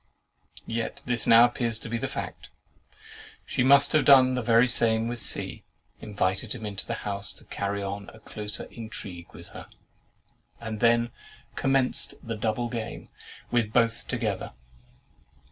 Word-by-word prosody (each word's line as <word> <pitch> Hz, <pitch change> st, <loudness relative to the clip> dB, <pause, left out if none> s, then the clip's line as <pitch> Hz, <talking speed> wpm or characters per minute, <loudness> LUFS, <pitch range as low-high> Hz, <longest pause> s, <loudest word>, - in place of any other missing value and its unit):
Yet 115 Hz, 0 st, -4 dB
this 120 Hz, -2 st, 0 dB
now 115 Hz, +1 st, +8 dB
appears 120 Hz, -2 st, -1 dB
to -, -, -8 dB
be 115 Hz, 0 st, -2 dB
the -, -, -2 dB
fact. -, -, -6 dB, 1.0 s
She -, -, -1 dB
must 140 Hz, +2 st, +5 dB
have 155 Hz, -2 st, +4 dB
done 130 Hz, -2 st, +7 dB
the 125 Hz, -, -1 dB
very 115 Hz, +1 st, +4 dB
same 115 Hz, -1 st, +1 dB
with 120 Hz, 0 st, -4 dB
C——, -, -, -2 dB, 0.4 s
invited 100 Hz, 0 st, -2 dB
him 110 Hz, -3 st, -7 dB
into 100 Hz, -2 st, -2 dB
the 115 Hz, -, -2 dB
house 100 Hz, -1 st, -3 dB
to -, -, -17 dB
carry 100 Hz, 0 st, -3 dB
on 100 Hz, +1 st, -5 dB
a 110 Hz, -, -15 dB
closer 105 Hz, -1 st, -5 dB
intrigue 100 Hz, -6 st, -8 dB
with -, -, -12 dB
her, -, -, -10 dB, 0.9 s
and 110 Hz, -2 st, -5 dB
then 120 Hz, +1 st, +3 dB, 0.4 s
commenced 135 Hz, -1 st, +1 dB
the 115 Hz, -1 st, -4 dB
double 110 Hz, +3 st, -1 dB
game 115 Hz, -2 st, -6 dB, 0.4 s
with 115 Hz, -3 st, +1 dB
both 115 Hz, -1 st, +1 dB
together. -, -, -3 dB
115 Hz, 150 wpm, -27 LUFS, 105-120 Hz, 1.0 s, now